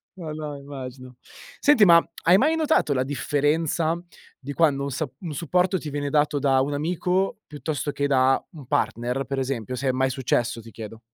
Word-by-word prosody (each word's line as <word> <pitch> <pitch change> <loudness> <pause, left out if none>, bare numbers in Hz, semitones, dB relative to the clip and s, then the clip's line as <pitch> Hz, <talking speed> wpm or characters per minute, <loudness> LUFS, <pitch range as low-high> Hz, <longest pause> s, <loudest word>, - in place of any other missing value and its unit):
no 165 -4 -7
no, 150 -2 -5
immagino. 130 -2 -9 0.4
Senti 270 -8 +5
ma, 170 -2 +7 0.2
hai 180 +3 +6
mai 305 +8 +3
notato 310 - +2
la 130 -1 +1
differenza 150 +4 0 0.4
di 140 +1 -8
quando 145 -4 +2
un 140 - -3
sa 145 +1 -3
un 165 -4 -6
supporto 180 +5 +1
ti 150 - -6
viene 145 0 -3
dato 150 0 +2
da 135 -2 +3
un 140 +2 0
amico 180 +6 0
piuttosto 145 -1 -3
che 145 0 -1
da 130 -1 +3
un 145 -7 -12
partner, 125 +3 -1
per 135 -1 -3
esempio? 130 -2 -3
Se 130 +2 -3
è - - +4
mai 130 +1 +1
successo 120 -2 -1
ti 115 +1 -13
chiedo. 110 0 -9
145 Hz, 190 wpm, -24 LUFS, 130-165 Hz, 0.4 s, ma